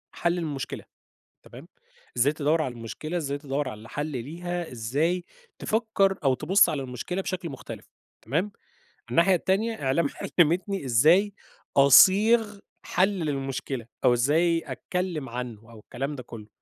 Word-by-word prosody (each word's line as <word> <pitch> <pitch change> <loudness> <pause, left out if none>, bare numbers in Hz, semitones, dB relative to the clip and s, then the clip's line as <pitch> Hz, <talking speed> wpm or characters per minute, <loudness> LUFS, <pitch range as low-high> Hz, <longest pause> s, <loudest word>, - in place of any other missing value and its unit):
حَل 170 +1 0
المشكلة، 150 -6 -4 0.6
تمام؟ - - -13 0.5
إزاي 140 +5 +3
تدوّر 155 +2 +1
على 130 -5 -3
المشكلة، 120 +9 -5
إزاي 140 -4 -2
تدوّر 140 -1 -3
على 110 -1 -10
حَل 145 +1 -3
ليها، 170 +6 -5
إزاي 145 +10 -1 0.3
تفكّر 215 -3 +1
أو 135 -2 +3
تبُص 190 +9 +4
على 150 -3 -2
المشكلة 130 +9 -4
بشكل 185 -3 -4
مختلف، 135 - -9 0.4
تمام؟ 165 - -1 0.6
الناحية 185 +3 +4
التانية 200 +4 -1
إعلام 135 +4 +2 0.3
علّمتني 175 +1 +2
إزاي 165 - +4 0.4
أصيغ 205 - +6 0.3
حَل 185 +3 +2
للمشكلة 135 -5 -3 0.2
أو 120 - +5
إزاي 165 +7 +2
أتكلّم 180 -7 -4
عنّه 115 -2 -7
أو 115 - -13
الكلام 135 +7 -5
ده 125 - -8
كُلّه. 110 -3 -10
155 Hz, 135 wpm, -26 LUFS, 130-180 Hz, 0.6 s, أصيغ